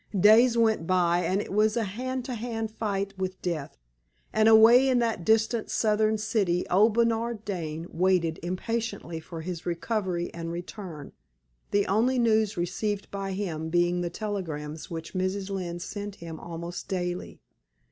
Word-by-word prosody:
Days 230 +5 +6
went 220 -7 +2
by; 175 -2 +3
and 190 +2 +1
it - - -7
was 215 +2 +3
a 230 - +2
hand 250 +5 -4
to 255 - -4
hand 225 -1 -3
fight 200 -3 -2
with 185 0 -3
death. 160 - -3 0.6
And 220 0 +5
away 230 +4 +7
in 255 - +3
that 230 -7 0
distant 220 +2 +2
Southern 215 0 +2
city, 200 -5 0
old 210 +4 +5
Bernard 230 -1 +1
Dane 165 -5 -4
waited 175 -2 +1
impatiently 185 -1 -3
for 165 0 -8
his 175 0 -6
recovery 175 0 -2
and 165 0 -5
return, 175 -3 -7 0.6
the 205 0 +2
only 230 +7 +2
news 220 -4 +2
received 195 +4 -2
by 195 -1 -3
him 165 -5 -3
being 175 +1 +2
the 175 - -1
telegrams 160 -7 -5
which 165 -1 -6
Mrs. 190 +1 -2
Lynne 180 -3 -3
sent 205 +2 -6
him 165 -3 -8
almost 170 +1 -6
daily. 180 -1 -3
195 Hz, 155 wpm, -27 LUFS, 175-220 Hz, 0.6 s, away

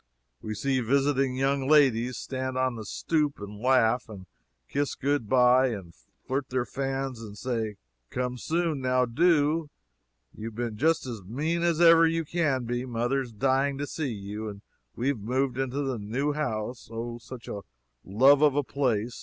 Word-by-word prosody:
We 110 0 -4
see 135 +4 0
visiting 135 +1 +1
young 135 0 0
ladies 125 -5 +4
stand 130 -1 -4
on 130 -1 +1
the 110 -2 -7
stoop, 150 +6 -1
and 105 0 -8
laugh, 125 -1 +3
and 100 -4 -9 0.4
kiss 145 - -1
good 140 -5 -1
bye, 125 0 +5
and 95 -8 -5 0.3
flirt 135 0 -2
their 130 -1 0
fans 135 -2 -3
and 105 -2 -9
say 115 -3 -2 0.3
"Come 125 0 -3
soon 165 -2 -1
now 125 0 +2
do 155 +3 +2 0.7
you've 110 0 -7
been 120 -2 -3
just 160 +7 +2
as 115 -5 -6
mean 150 - -2
as 170 -2 +1
ever 165 -1 +7
you 165 0 -1
can 150 -6 0
be 120 +1 -2
mother's 125 +1 -1
dying 135 +4 +1
to 145 - -2
see 145 -2 -3
you 105 +1 -5
and 100 -1 -10 0.3
we've 130 0 -1
moved 130 +4 -1
into 135 +2 -1
the 130 -4 -2
new 130 +8 -1
house, 120 -5 -3
O 120 +1 -5
such 120 0 -10
a 100 - -5 0.4
love 135 +9 +5
of 150 -3 +4
a 145 - +2
place! 120 -5 -1
130 Hz, 170 wpm, -27 LUFS, 115-140 Hz, 0.7 s, ever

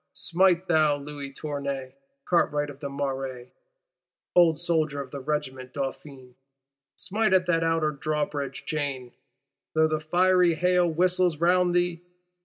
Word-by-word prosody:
Smite, 180 +1 +2
thou 155 -3 +3
Louis 145 -1 -8
Tournay, 140 -2 -5 0.3
cartwright 145 -4 +1
of 140 - -15
the 140 - -5
Marais, 135 -3 -4 0.8
old 170 -3 +5
soldier 160 -4 0
of 135 -2 -6
the 140 - -6
Regiment 130 -3 -4
Dauphine; 135 -2 -6 0.6
smite 215 0 0
at 185 -1 +4
that 165 -2 +1
Outer 165 -2 +1
Drawbridge 145 -2 -3
chain, 140 -5 -3 0.6
though 160 0 +4
the 155 0 -1
fiery 180 +2 +3
hail 180 +1 +2
whistles 180 0 +2
round 175 +2 +3
thee! 175 -1 0
155 Hz, 130 wpm, -26 LUFS, 140-175 Hz, 0.8 s, old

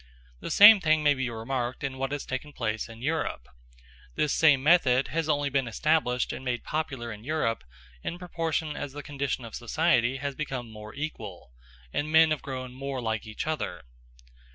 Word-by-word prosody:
The - - -6
same 205 +1 +9
thing 155 -3 +2
may 145 -1 +5
be 130 -3 -2
remarked 120 +3 -3
in 135 -1 -3
what 135 0 -2
has 145 -1 -3
taken 130 +3 -5
place 110 -2 -2
in 115 +1 -11
Europe. 150 - -2 0.7
This 150 - +1
same 140 -5 +4
method 140 -5 +4
has 160 -1 -1
only 145 -1 +1
been 135 -2 +1
established 125 0 +1
and - - -7
made 125 -2 -2
popular 135 -7 -3
in 105 0 -12
Europe 135 - -1 0.4
in 175 - -4
proportion 165 -3 -2
as 145 -2 -5
the 145 0 -7
condition 140 -3 -3
of 115 - -10
society 130 0 +1
has 140 0 -3
become 130 -5 -5
more 105 0 -10
equal, 110 - -6 0.4
and 150 +1 -1
men 160 0 +6
have 155 - 0
grown 130 -2 -6
more 135 0 -4
like 110 -2 -2
each 110 - -5
other. 150 - -3
135 Hz, 180 wpm, -28 LUFS, 120-155 Hz, 0.7 s, same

